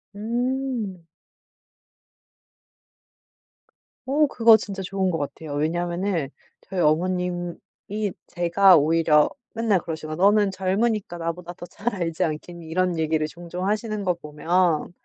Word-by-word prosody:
음. 235 Hz, -4 st, -2 dB, 3.0 s
어 295 Hz, +3 st, +3 dB
그거 230 Hz, -4 st, +6 dB
진짜 195 Hz, -2 st, -6 dB
좋은 190 Hz, 0 st, -1 dB
것 165 Hz, -, -1 dB
같아요. 145 Hz, +1 st, -5 dB
왜냐하면은 175 Hz, 0 st, -1 dB, 0.3 s
저희 185 Hz, -2 st, -3 dB
어머님이 180 Hz, +4 st, -1 dB, 0.2 s
제가 175 Hz, +2 st, +5 dB
오히려 155 Hz, 0 st, +4 dB, 0.2 s
맨날 225 Hz, -5 st, +2 dB
그러시거든요. 155 Hz, +1 st, -5 dB
"너는 205 Hz, 0 st, +5 dB
젊으니까 195 Hz, 0 st, -1 dB
나보다 170 Hz, +1 st, -4 dB
더 175 Hz, -, -10 dB
잘 205 Hz, +6 st, -4 dB
알지 165 Hz, -3 st, -1 dB
않겠니?" 165 Hz, +2 st, -6 dB
이런 180 Hz, 0 st, 0 dB
얘기를 155 Hz, -1 st, +1 dB
종종 175 Hz, +4 st, -6 dB
하시는 215 Hz, 0 st, -1 dB
거 180 Hz, -2 st, +2 dB
보면 165 Hz, +2 st, 0 dB
180 Hz, 260 characters per minute, -24 LUFS, 165-205 Hz, 3.0 s, 그거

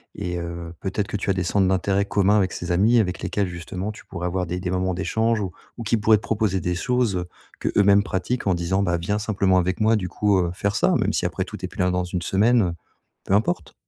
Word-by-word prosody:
et 90 Hz, 0 st, -3 dB
heu, 85 Hz, 0 st, -6 dB
peut-être 100 Hz, +1 st, -2 dB
que -, -, -3 dB
tu 100 Hz, -, -4 dB
as 95 Hz, -, +4 dB
des 90 Hz, -, -1 dB
centres 95 Hz, +2 st, +2 dB
d'intérêts 95 Hz, +1 st, +1 dB
communs 100 Hz, +1 st, +3 dB
avec 95 Hz, -3 st, +1 dB
ses 85 Hz, 0 st, -4 dB
amis 110 Hz, +7 st, +4 dB
avec 90 Hz, -3 st, -1 dB
lesquels 100 Hz, -2 st, -1 dB
justement 90 Hz, +4 st, -5 dB
tu 105 Hz, -, -13 dB
pourrais 90 Hz, -2 st, -4 dB
avoir 90 Hz, 0 st, -1 dB
des 90 Hz, +1 st, -3 dB
des 90 Hz, -, -3 dB
moments 95 Hz, 0 st, 0 dB
d'échange 110 Hz, +5 st, 0 dB
ou 95 Hz, -3 st, -3 dB, 0.3 s
ou 115 Hz, -, -5 dB
qui 115 Hz, +1 st, +1 dB
pourraient 110 Hz, +1 st, +5 dB
te 105 Hz, -, -9 dB
proposer 105 Hz, -5 st, 0 dB
des 90 Hz, +1 st, -1 dB
choses, 125 Hz, 0 st, 0 dB
heu, 90 Hz, 0 st, -4 dB, 0.3 s
qu'eux-mêmes 100 Hz, 0 st, +4 dB
pratiquent 100 Hz, +4 st, -2 dB
en 95 Hz, -, +4 dB
disant: 90 Hz, +3 st, 0 dB
«Bah, 85 Hz, -2 st, +1 dB
viens 105 Hz, +5 st, -1 dB
simplement 95 Hz, -3 st, +1 dB
avec 95 Hz, +4 st, 0 dB
moi, 110 Hz, +1 st, +4 dB
du 90 Hz, -3 st, -3 dB
coup, 100 Hz, +1 st, +1 dB
heu, 85 Hz, -1 st, +1 dB
faire 100 Hz, +2 st, -1 dB
ça» -, -, +3 dB
même -, -, +1 dB
si -, -, -1 dB
après -, -, -1 dB
tout, -, -, -8 dB
tu -, -, -5 dB
es -, -, -3 dB
plus -, -, -14 dB
là 90 Hz, -, +2 dB
dans 90 Hz, 0 st, 0 dB
1 90 Hz, 0 st, -3 dB
semaine, 110 Hz, +7 st, +3 dB
heu, 90 Hz, -3 st, 0 dB, 0.5 s
peu 95 Hz, -, -1 dB
importe. 90 Hz, -6 st, 0 dB
95 Hz, 260 wpm, -23 LUFS, 90-105 Hz, 0.5 s, pourraient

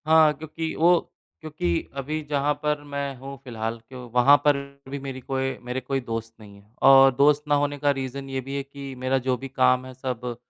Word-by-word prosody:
हाँ, 160 Hz, -1 st, +6 dB
क्योंकि 160 Hz, +2 st, -5 dB
वो 175 Hz, +1 st, +5 dB, 0.4 s
क्योंकि 145 Hz, -, -2 dB
अभी 150 Hz, +3 st, -3 dB
जहाँ 145 Hz, 0 st, +1 dB
पर 150 Hz, -1 st, 0 dB
मैं 140 Hz, -1 st, -3 dB
हूँ 135 Hz, +2 st, -8 dB
फिलहाल 115 Hz, -2 st, -4 dB
क्यों 125 Hz, -2 st, -9 dB
वहाँ 125 Hz, +4 st, +6 dB
पर 145 Hz, -1 st, +5 dB, 0.3 s
भी 140 Hz, +1 st, -4 dB
मेरी 135 Hz, -1 st, -6 dB
कोई 135 Hz, 0 st, -2 dB
मेरे 125 Hz, +1 st, -3 dB
कोई 135 Hz, +2 st, -2 dB
दोस्त 115 Hz, -2 st, -5 dB
नहीं 105 Hz, -2 st, -13 dB
है। 105 Hz, +2 st, -28 dB
और 135 Hz, 0 st, +8 dB
दोस्त 145 Hz, +2 st, +4 dB
ना 145 Hz, -, +3 dB
होने 145 Hz, 0 st, 0 dB
का 145 Hz, 0 st, +2 dB
रीज़न 135 Hz, 0 st, -5 dB
ये 135 Hz, 0 st, -2 dB
भी 135 Hz, +2 st, -6 dB
है 140 Hz, -, -2 dB
कि 140 Hz, 0 st, -9 dB
मेरा 130 Hz, +1 st, +1 dB
जो 130 Hz, -, +3 dB
भी 135 Hz, -, -7 dB
काम 130 Hz, -1 st, +2 dB
है 130 Hz, -, -9 dB
सब 125 Hz, -2 st, -4 dB
135 Hz, 210 wpm, -25 LUFS, 125-145 Hz, 0.4 s, और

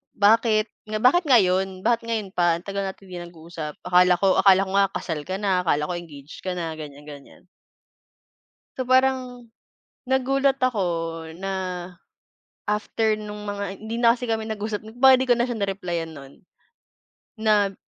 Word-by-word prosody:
"Bakit, 215 Hz, +1 st, +3 dB, 0.2 s
nga 215 Hz, -, -1 dB
bakit 275 Hz, +10 st, +4 dB
ngayon? 190 Hz, -, +2 dB
Bakit 235 Hz, -1 st, +2 dB
ngayon 225 Hz, -4 st, -3 dB
pa? 170 Hz, -1 st, +2 dB
Ang -, -, -19 dB
tagal 200 Hz, 0 st, -2 dB
natin 195 Hz, 0 st, -7 dB
'di 185 Hz, -, -9 dB, 0.2 s
nag-uusap 160 Hz, -2 st, -8 dB
akala 180 Hz, 0 st, +4 dB
ko, 195 Hz, -1 st, +3 dB
akala 195 Hz, 0 st, +6 dB
ko -, -, -6 dB
nga 195 Hz, -1 st, +3 dB
kasal 160 Hz, -4 st, -4 dB
ka 185 Hz, -, -4 dB
na, 190 Hz, -3 st, +1 dB
akala 150 Hz, -3 st, +1 dB
ko -, -, -3 dB
engage 150 Hz, -4 st, -10 dB
ka 185 Hz, -, -2 dB
na", 170 Hz, -3 st, -4 dB
ganyan-ganyan. 145 Hz, -2 st, -11 dB, 1.3 s
So, 255 Hz, -1 st, -3 dB
parang, 255 Hz, -2 st, +1 dB, 0.6 s
nagulat 270 Hz, +1 st, +2 dB
ako 255 Hz, -6 st, 0 dB, 0.6 s
na, 185 Hz, -2 st, -4 dB, 0.7 s
after 215 Hz, +1 st, 0 dB
no'ng 210 Hz, 0 st, -7 dB
mga 205 Hz, -1 st, -4 dB, 0.2 s
hindi 220 Hz, +1 st, -5 dB
na 235 Hz, -1 st, +5 dB
kasi 250 Hz, -, -10 dB
kami 225 Hz, -2 st, -2 dB
nag-usap, 215 Hz, -1 st, -3 dB
'di 220 Hz, -, -12 dB
ba, 265 Hz, +1 st, +7 dB
'di 260 Hz, -, -1 dB
ko 245 Hz, -, +5 dB
na 240 Hz, -, +1 dB
siya 240 Hz, -, -3 dB
ni-reply-yan 175 Hz, -5 st, -3 dB
no'n. 140 Hz, -1 st, -12 dB, 1.1 s
Na 205 Hz, -2 st, +3 dB
200 Hz, 160 wpm, -24 LUFS, 180-230 Hz, 1.3 s, ba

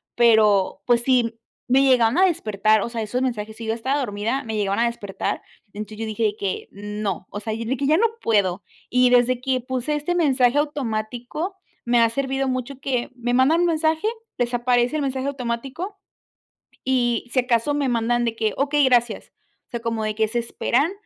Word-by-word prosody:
Pero 215 Hz, -5 st, +4 dB
pues 240 Hz, -1 st, +4 dB
sí 235 Hz, -3 st, +2 dB, 0.3 s
me 265 Hz, +2 st, +4 dB
llegaban 250 Hz, -1 st, +4 dB
a 375 Hz, -, +6 dB
despertar, 215 Hz, -, +2 dB
o -, -, -3 dB
sea, 230 Hz, -1 st, -3 dB
esos 245 Hz, +4 st, -2 dB
mensajes, 220 Hz, -4 st, -3 dB
si 230 Hz, -, -8 dB
yo 220 Hz, -, -4 dB
ya 225 Hz, -, +1 dB
estaba 265 Hz, +5 st, -1 dB
dormida, 225 Hz, +2 st, -2 dB
me 220 Hz, -, -4 dB
llegaban 200 Hz, -1 st, 0 dB
a 235 Hz, -, +3 dB
despertar, 205 Hz, -4 st, -4 dB, 0.3 s
entonces 215 Hz, +1 st, -7 dB
yo 225 Hz, -, -2 dB
dije 220 Hz, +1 st, -3 dB
de 210 Hz, -1 st, +1 dB
que: 195 Hz, -2 st, -3 dB
"No", 205 Hz, -2 st, -4 dB
o 205 Hz, -, -5 dB
sea, 220 Hz, +1 st, -4 dB
y 225 Hz, +1 st, -4 dB
de 260 Hz, +4 st, -1 dB
que: 280 Hz, -, -2 dB
"Ya 310 Hz, +3 st, +4 dB
no 460 Hz, -, +4 dB, 0.2 s
puedo". 200 Hz, -4 st, +1 dB, 0.3 s
Y 250 Hz, 0 st, +4 dB
desde 245 Hz, 0 st, +3 dB
que 255 Hz, -1 st, 0 dB
puse 260 Hz, +4 st, -2 dB
este 300 Hz, +4 st, -1 dB
mensaje 270 Hz, -5 st, +3 dB
automático, 255 Hz, -, -2 dB, 0.3 s
me 240 Hz, 0 st, +3 dB
ha 230 Hz, -1 st, +5 dB
servido 270 Hz, +1 st, -1 dB
mucho 255 Hz, +1 st, -3 dB
que 255 Hz, -3 st, -2 dB
me 245 Hz, 0 st, -2 dB
mandan 285 Hz, +6 st, +4 dB
un 350 Hz, -, +3 dB
mensaje, 320 Hz, +3 st, +1 dB, 0.3 s
desaparece 245 Hz, +2 st, +1 dB
el 305 Hz, -, 0 dB
mensaje 265 Hz, 0 st, -2 dB
automático 275 Hz, -, -4 dB, 0.9 s
y, 245 Hz, -2 st, +1 dB
si 255 Hz, -, +4 dB
acaso, 245 Hz, +3 st, +1 dB
me 285 Hz, -2 st, 0 dB
mandan 240 Hz, +1 st, +1 dB
de 230 Hz, -1 st, -2 dB
que: 220 Hz, -2 st, 0 dB
"Okey, 290 Hz, +1 st, +2 dB
gracias". 240 Hz, -3 st, +1 dB, 0.4 s
O -, -, -42 dB
sea, 235 Hz, -, -3 dB
como 230 Hz, -1 st, -2 dB
de 215 Hz, 0 st, -1 dB
que 220 Hz, 0 st, +1 dB
se 240 Hz, -, -1 dB
esperan 250 Hz, +6 st, 0 dB
240 Hz, 200 wpm, -23 LUFS, 220-270 Hz, 0.9 s, a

